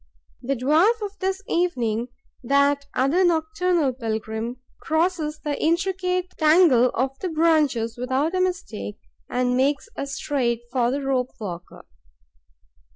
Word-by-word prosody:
The 275 +3 -1
dwarf 315 - +3
of 410 0 -6
this 385 +1 -2
evening, 245 -10 0 0.4
that 280 +2 +2
other 280 +9 +3
nocturnal 325 -3 +1
pilgrim, 225 0 -4 0.2
crosses 315 -1 0
the 295 -1 -1
intricate 365 +2 0
tangle 305 -6 +5
of 265 +2 -1
the 370 - -3
branches 300 -8 +1
without 260 +6 0
a 370 - +1
mistake 360 - -3 0.3
and 250 0 0
makes 275 +2 +1 0.2
straight 270 -4 -1
for 245 -2 +1
the 275 +2 -2
rope 260 -2 -1
walker. 180 -5 -8
280 Hz, 120 wpm, -23 LUFS, 250-345 Hz, 0.4 s, tangle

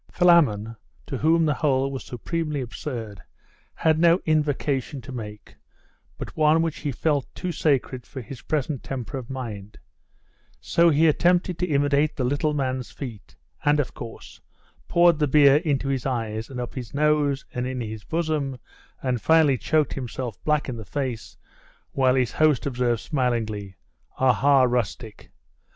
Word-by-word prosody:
Philammon, 135 - +3 0.3
to 135 - -5
whom 165 +1 +3
the 150 - +2
whole 135 -3 +1
was 135 - -5
supremely 150 +4 -3
absurd, 115 -4 -6 0.5
had 160 -1 +2
no 170 +1 +5
invocation 145 -3 0
to 130 - -10
make, 105 -4 -8 0.6
but - - -7
one 155 +1 +4
which 165 -2 -3
he 145 - -2
felt 145 +1 0
too 180 - -3
sacred 135 -5 0
for 135 - -8
his 130 +2 -9
present 150 -3 -2
temper 130 -2 -5
of 125 - -10
mind: 110 -6 -7 0.8
so 170 0 +3
he 160 +1 +4
attempted 175 +3 +2
to 180 - 0
imitate 145 0 +2
the 130 - -2
little 145 +4 0
man's 130 -3 -2
feat, 120 -7 -9 0.3
and, 145 +1 +3
of 145 - -1
course, 115 -2 -10 0.5
poured 170 -2 +4
the 150 - +2
beer 140 0 +6
into 145 -4 -1
his 135 -1 -1
eyes, 115 -3 -3
and 130 -2 -6
up 120 - -5
his 125 -1 -7
nose, 150 -2 +2
and 125 0 -2
in 130 0 -4
his 110 -3 -6
bosom, 155 -5 -2 0.5
and 125 -3 -1
finally 160 -4 +4
choked 150 +4 +1
himself 125 -3 -5
black 150 -1 +1
in 125 -3 -4
the 110 - -7
face, 125 +1 -4 0.5
while 130 -1 +2
his 125 -2 +1
host 155 -5 +2
observed 120 -4 0
smilingly 110 -8 -2 0.4
'Aha, 130 +1 +4
rustic! 120 -3 -2
135 Hz, 155 wpm, -24 LUFS, 125-150 Hz, 0.8 s, beer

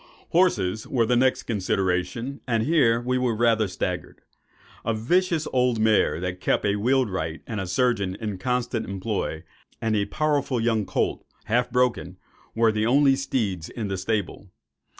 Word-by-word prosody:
Horses 110 - +1
were 120 -3 +1
the 125 - +2
next 130 +2 +2
consideration; 95 +4 -1
and 115 -3 +1
here 125 -6 +3
we 125 +1 -1
were 125 -3 0
rather 115 -1 +2
staggered. 90 -1 -4 0.6
A 115 0 0
vicious 165 +7 +1
old 125 -3 +2
mare, 110 -6 +3
that 90 +1 -4
kept - - +1
a 100 0 +2
wheelwright 100 -9 0
and 110 -3 -4
a 95 - -4
surgeon 100 -1 +1
in 105 -4 -4
constant 125 +1 -1
employ,—and 100 +1 -4
a 100 -1 +1
powerful 145 +1 0
young 115 -3 0
colt, - - -1 0.2
half 120 +2 +1
broken,—were 115 -2 -1
the 110 +1 0
only 135 +2 +5
steeds 105 -11 -2
in 105 -5 -4
stable. 100 0 -3
115 Hz, 145 wpm, -25 LUFS, 95-125 Hz, 0.6 s, only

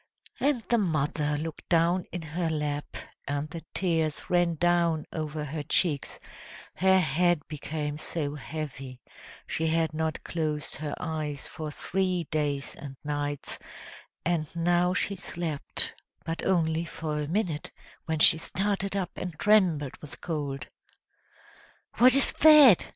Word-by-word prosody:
And 275 -5 +1
the 235 -1 +3
mother 150 -4 0
looked 160 +1 -6
down 170 +1 +3
in 175 -2 -5
her 165 +2 -2
lap, 150 -2 -3 0.3
and 145 +1 -1
the 165 -1 -7
tears 165 -5 -1
ran 175 -1 +3
down 170 -1 +2
over 155 -1 -3
her 150 +2 -4
cheeks; 145 0 0 0.5
her 190 +1 +4
head 175 -2 +2
became 150 0 -4
so 150 -3 -3
heavy 135 -3 -6 0.5
she 160 - -1
had 160 0 +1
not 160 0 -2
closed 155 -3 -2
her 150 0 -4
eyes 150 -3 -3
for 155 -1 -6
three 185 +3 -1
days 145 -3 -1
and 135 -2 -9
nights; 145 -1 -3 0.7
and 165 -2 +1
now 175 +2 +2
she 200 - +1
slept, 170 -5 -3 0.3
but 165 0 -3
only 165 -3 +2
for 155 -2 -4
a 145 - -3
minute, 170 -4 -1 0.4
when 160 -1 -1
she 160 +1 +7
started 195 +2 -1
up 190 -2 -1
and 180 -4 -5
trembled 175 -9 +3
with 150 - -9
cold. 140 -6 -3 1.3
"What 250 +2 +8
is 275 - +2
that?" 295 - +8
160 Hz, 135 wpm, -28 LUFS, 150-175 Hz, 1.3 s, What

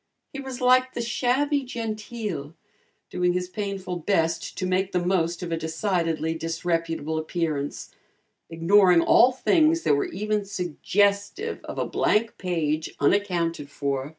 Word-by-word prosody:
He 275 - -5
was 265 -1 -7
like 255 +1 +4
the - - -3
"shabby 270 +5 +1
genteel," 215 - -5 0.6
doing 180 0 +1
his 180 0 -2
painful 195 -2 -4
best 165 -2 -1
to 185 - -2
make 185 +1 0
the 180 -1 0
most 175 -1 0
of 170 - -5
a 165 - 0
decidedly 165 -1 -1
disreputable 165 -1 -2
appearance, 155 -3 -3 0.6
ignoring 175 +2 +5
all 245 +8 +6
things 320 +5 +2
that - - +3
were 140 - +1
even 210 +2 -2
suggestive 200 - -1
of - - -7
a - - 0
blank 225 +2 0
page 160 -4 -2
unaccounted 170 -3 +1
for. 140 -1 -3
180 Hz, 135 wpm, -25 LUFS, 165-215 Hz, 0.6 s, all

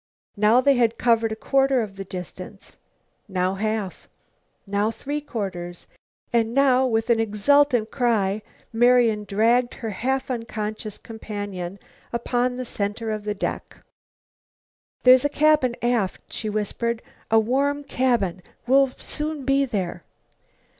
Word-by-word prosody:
Now 215 +4 +4
they 280 +2 +4
had 235 -2 +2
covered 230 -2 +2
a - - -2
quarter 270 +1 +2
of 200 -2 -8
the 195 - -6
distance, 185 +1 -9 0.5
now 185 -1 0
half, 215 -1 -3 0.6
now 205 +1 0
three 290 +6 -4
quarters. 180 -9 -5 0.5
And 230 0 +1
now, 265 -2 +4
with 225 0 +1
an 230 - +3
exultant 225 +2 +2
cry, 215 -5 +1 0.3
Marian 235 -2 +4
dragged 230 +5 +2
her 225 -2 -5
half 265 +6 -2
unconscious 215 -3 -4
companion 205 -4 -6 0.3
upon 245 +1 0
the 255 0 -4
center 220 +1 -3
of 215 -1 -4
the 210 0 -2
deck. - - -4 1.3
"There's 255 0 +7
a 290 - +2
cabin 295 -4 +3
aft," 235 -6 0
she 215 - -3
whispered, 225 +2 -2 0.3
"a 225 - +5
warm 280 +6 0
cabin. 235 -10 0 0.2
We'll 270 +2 +4
soon 300 -2 -4
be 275 +1 +3
there." 195 -8 -3
225 Hz, 130 wpm, -24 LUFS, 205-255 Hz, 1.3 s, There's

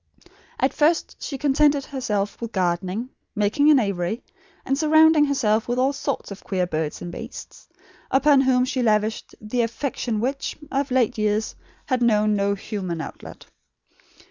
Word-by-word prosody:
At 265 - +1
first 315 +3 +1
she 275 - -4
contented 285 0 +2
herself 210 -8 -3
with 230 -1 -4
gardening, 185 +5 -1 0.3
making 215 +8 +2
an 300 - +7
aviary, 200 0 -2 0.4
and 270 - +1
surrounding 315 0 +5
herself 225 -6 +1
with 245 +1 -1
all 265 +2 +2
sorts 275 - -4
of 200 - -9
queer 185 -2 -1
birds 155 -3 -3
and 175 - -6
beasts; - - -10 0.4
upon 275 +1 +4
whom 255 -1 +3
she 255 0 -2
lavished 215 -1 0
the 220 +3 -1
affection 230 -1 -2
which, 270 +5 -2
of 275 +1 0
late 250 -3 +1
years, 215 +1 0 0.3
had 255 -3 0
known 215 -2 +3
no 200 0 +1
human 190 -5 -5
outlet. 160 - -9
235 Hz, 150 wpm, -23 LUFS, 205-275 Hz, 0.4 s, an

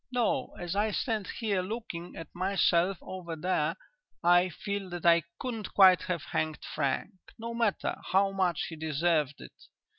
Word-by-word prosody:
No, 245 -2 0
as 175 +1 -3
I 210 +2 +2
stand 215 -1 -1
here 205 -5 -1
looking 185 -4 -6
at 165 - -7
myself 185 0 +2
over 175 -3 -6
there, 180 +4 0 0.5
I 175 +1 +5
feel 200 +2 -4
that 175 -1 -6
I 170 0 +6 0.2
couldn't 230 -5 -5
quite 190 -2 +8
have 175 -4 -2
hanged 155 -1 -1 0.2
Frank, 140 -3 -1 0.3
no 230 0 -5
matter 230 -4 0
how 195 +1 +4
much 185 -4 0
he 165 - -7
deserved 155 -1 0
it.... - - -14
185 Hz, 155 wpm, -30 LUFS, 170-200 Hz, 0.5 s, quite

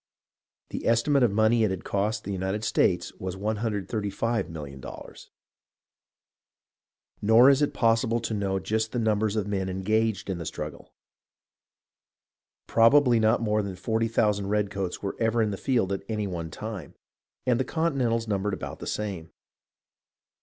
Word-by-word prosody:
The - - -4
esti 115 +5 +2
mate 140 -1 +4
of 120 - +5
the 100 - -5
money 110 +1 +4
it 110 - +3
had 95 -2 -4
cost 105 +2 -1
the 100 - -5
United 95 +2 -2
States 105 - +1
was 95 0 -4
$135,000,000. 105 - -3 1.9
Nor 115 +5 +7
is 140 +1 +2
it 145 - 0
possible 115 0 +2
to 115 -1 -3
know 100 -2 -1
just 110 +3 -1
the - - -1
numbers 110 -2 +1
of 105 -3 0
men 95 -2 -2
engaged 105 +2 0
in 95 -3 -3
the 85 - -5
struggle. - - -7 1.7
Probably 120 +1 +5
not 110 +2 +3
more 105 -1 +1
than 100 -2 -5
forty 110 +5 0
thousand 105 -3 +1
redcoats 100 -3 -2
were 100 - -3
ever 115 0 +1
in 110 -2 +2
the - - -2
field 105 -4 0
at 95 - -3
any 105 -2 -1
one 85 -4 -4
time, 100 -3 -7 0.5
and 125 -1 +2
the - - +2
Continentals 130 -8 0
numbered 100 -1 -1
about - - -7
the - - -7
same. 95 -6 -4
105 Hz, 155 wpm, -27 LUFS, 100-115 Hz, 1.9 s, Nor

